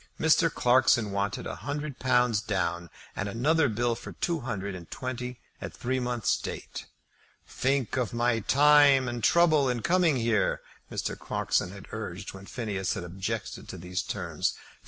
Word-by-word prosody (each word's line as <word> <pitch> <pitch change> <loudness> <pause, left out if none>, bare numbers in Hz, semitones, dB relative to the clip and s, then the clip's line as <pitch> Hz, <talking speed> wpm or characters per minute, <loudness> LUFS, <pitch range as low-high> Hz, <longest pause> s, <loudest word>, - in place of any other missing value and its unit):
Mr. 160 +1 +4
Clarkson 125 -5 +3
wanted 100 0 -2
a - - -5
hundred 145 -1 -5
pounds 125 -4 +3
down, 85 -4 -2 0.3
and 100 - -2
another 145 +8 +2
bill 120 +2 0
for 115 - -8
two 170 -2 -1
hundred 100 -6 -4
and 90 -2 -9
twenty 125 -1 -5 0.2
at - - -6
three 130 +2 -1
months' 120 -3 0
date. - - -7 0.6
"Think 135 -2 0
of 120 -6 0
my 120 0 +1
time 140 +2 +5
and 120 -2 -4
trouble 155 -5 +4
in 120 -2 -2
coming 175 -4 +3
here," 115 -4 +1 0.3
Mr. - - -2
Clarkson - - -1
had 100 0 -10
urged 105 -3 -6
when 95 0 -11
Phineas 105 -6 -2
had - - -4
objected 95 +5 -5
to - - -6
these 90 +1 -3
terms. - - -2
120 Hz, 155 wpm, -28 LUFS, 100-135 Hz, 0.6 s, time